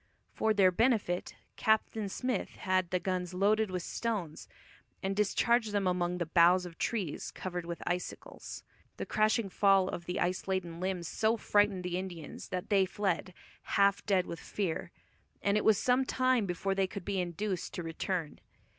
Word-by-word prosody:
For 220 - +1
their 195 -3 +5
benefit, 215 -4 +1 0.2
Captain 220 -1 +1
Smith 250 +1 -2
had 185 -2 0
the 180 -1 +1
guns 180 -1 -2
loaded 210 +3 +3
with 180 -2 -3
stones, 205 -10 -3 0.6
and 195 +1 -1
discharged 215 +2 +2
among 180 -2 +1
the 175 - -1
boughs 175 +2 +5
of 170 -2 -10
trees 195 -10 -2
covered 180 -2 -5
with 170 -1 -5
icicles. 180 +1 -5 0.3
The - - -3
crashing 215 0 +2
fall 195 -1 +4
of 170 - -5
the 180 - -2
ice 180 +2 -1
laden 175 -3 -2
limbs 185 -2 -2
so 220 +5 +1
frightened 205 -3 +2
the 180 0 -2
Indians 175 -4 -7
that 185 +3 -4
they 195 -2 +4
fled, 185 -2 -1 0.5
"half 200 0 +4
dead 190 -3 +3
with 170 - -6
fear," 185 -6 -3 0.5
and 200 0 +2
it 210 - +2
was 215 -3 +5
some 250 +4 +3
time 255 -4 +2
before 185 +2 -1
they 195 0 +1
could 185 0 -7
be 195 -2 0
induced 180 +2 -3
to 175 - -4
return. 165 0 -3
190 Hz, 165 wpm, -31 LUFS, 180-210 Hz, 0.6 s, their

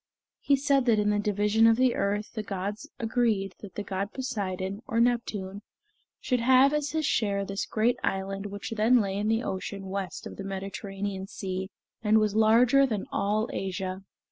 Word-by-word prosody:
He 280 - +3
said 275 -1 +2
that 230 -3 +4
in 210 0 +2
the 205 - +1
division 210 +2 +3
of 225 0 +5
the 255 -1 +3
earth 205 +1 -1
the 220 - -3
gods 205 +6 -5
agreed 220 -5 0
that 200 -3 -11
the 205 - -3
god 200 +1 -3
Poseidon, 200 -6 -3
or 230 - 0
Neptune, 210 -5 0 0.6
should 250 -2 0
have, 260 +4 +5
as 300 -1 0
his 315 0 -1
share, 200 -5 +1
this 195 0 -3
great 235 +3 +1
island 195 +1 -2
which 205 +2 -7
then 225 +3 +4
lay 195 -3 -1
in 205 +1 -1
the 225 +2 +1
ocean 195 +1 -4
west 190 -2 -5
of - - -8
the 195 - -5
Mediterranean 195 0 -5
Sea, 190 -1 -4 0.3
and 215 0 +4
was 215 -2 +2
larger 235 +5 +5
than 215 -5 -2
all 210 +2 0
Asia. 190 0 -3
210 Hz, 180 wpm, -28 LUFS, 195-230 Hz, 0.6 s, of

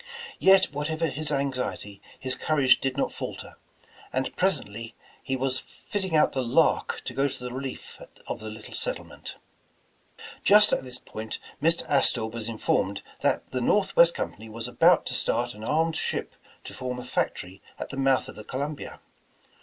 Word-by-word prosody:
Yet 190 -4 +6
whatever 155 +3 -1
his 155 +1 -1
anxiety, 130 -7 -2 0.2
his 130 -1 -1
courage 140 -4 +3
did 135 0 -1
not - - 0
falter, - - -7 0.5
and 130 0 -2
presently 115 - -1 0.3
he 135 - -2
was 130 0 +1
fitting 190 -6 -4
out 150 - +5
the 130 - -1
Lark 120 -2 +2
to - - -4
go 140 +1 +2
to 130 -2 -7
the 125 0 -5
relief 130 0 -6 0.2
of - - -4
the 110 - -6
little 110 0 -10
settlement. - - -4 1.1
Just 210 +1 +7
at - - +1
this 125 -1 -3
point, 110 -3 -6 0.2
Mr. 165 +2 +2
Astor 130 -5 +3
was 110 0 -5
informed 100 -3 0 0.2
that - - 0
the 130 - -1
Northwest 170 +2 +4
Company 110 +1 -5
was 115 +2 -4
about 125 - +4
to - - -2
start 120 0 0
an 105 +1 -10
armed 160 +6 +1
ship - - -2 0.3
to - - -8
form 125 -1 -4
a 125 - -7
factory 95 -5 -2 0.2
at - - -6
the - - -6
mouth 135 -1 +2
of - - -9
the 105 - -9
Columbia. 140 +5 -5
130 Hz, 170 wpm, -27 LUFS, 115-150 Hz, 1.1 s, Just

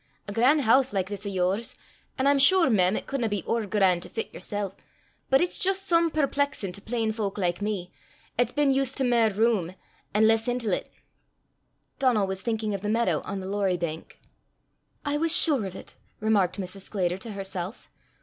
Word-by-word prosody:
A 200 - -5
gran' 260 +8 +4
hoose, 260 +1 +3
like 190 -1 -1
this 205 0 -5
o' - - -1
yours 190 +4 -1 0.4
an' 260 - 0
I'm 280 0 +4
sure, 335 0 +5
mem, 185 -2 +3
it - - -4
cudna 245 -5 -2
be 205 -3 -2
ower 230 -2 -1
gran' 190 -3 +2
to - - -10
fit 225 - -5
yersel', 205 -2 -4 0.5
but 270 - +4
it's 355 - +2
jist 385 +1 0
some 335 -1 +3
perplexin' 285 - -1
to 200 - -9
plain 225 0 -1
fowk 210 -3 -3
like 175 -1 -1
me, 205 -4 -3 0.4
'at's 245 0 +1
been 290 0 +2
used 270 -1 0
to 270 - 0
mair 235 -3 +3
room, 205 -4 0 0.4
an' 220 +1 +5
less 225 +1 +2
intil 245 -4 -1
't." - - -2 1.1
Donal 245 -7 +3
was 190 0 -4
thinking 220 -2 -2
of 195 - -4
the 210 - -3
meadow 215 -8 +1
on 195 0 -4
the 185 - -6
Lorrie 195 -2 0
bank. 165 -2 -6 0.9
"I 290 0 0
was 330 +1 +5
sure 275 - +4
of 185 - -9
it!" - - -11 0.2
remarked 205 -4 +1
Mrs. 190 +1 -6
Sclater 185 -2 -2
to 220 +2 -7
herself. 195 0 -6
215 Hz, 195 wpm, -26 LUFS, 190-255 Hz, 1.1 s, sure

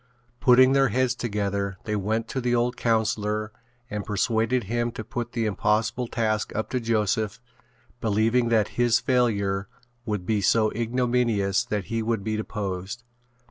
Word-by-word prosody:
Putting 130 0 +6
their 135 0 +4
heads 125 +2 +1
together 100 -4 -2
they 105 - -2
went 110 +3 -1
to 130 - -2
the 120 0 +1
old 120 +1 +1
councillor 110 -2 0 0.4
and 105 -2 -4
persuaded 110 +4 0
him 120 +3 -1
to 110 - -6
put 120 +1 -5
the 115 -2 0
impossible 110 +4 0
task 110 -2 -1
up 110 - -3
to 125 - 0
Joseph 110 -2 0 0.6
believing 115 +2 +2
that 110 -3 +2
his 120 -1 +4
failure 100 -6 +1 0.4
would 105 -4 -2
be 105 0 +1
so 110 +2 +3
ignominious 120 -3 +1
that 105 -5 -2
he 115 - 0
would 110 -2 -1
be 110 +1 -1
deposed. 100 0 -4
110 Hz, 150 wpm, -25 LUFS, 105-120 Hz, 0.6 s, Putting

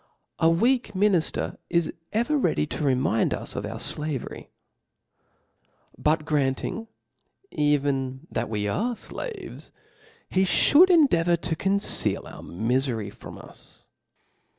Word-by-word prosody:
A 165 - +5
weak 235 +10 +2
minifter 185 -4 +1
is 170 -1 +1 0.2
ever 240 +8 +1
ready 270 - +1
to 150 - -4
rf 135 -3 +2
mind 115 -3 +1
V^^ - - -4
of - - -3
our - - -6
0avery« 150 -4 -4 1.5
But 155 0 +1
grandng 150 - -1 0.6
even 140 -2 0
that 115 0 -2
we 105 -2 -2
are 235 - -1
Aaves, 445 - -8 0.6
he 185 - +1
fliould 305 - +5
endeavour 175 - +4
to 165 0 -2
conceal 195 +4 +2
our - - -10
miiery 115 +1 -2
from - - -11
us. - - -13
160 Hz, 120 wpm, -25 LUFS, 135-210 Hz, 1.5 s, A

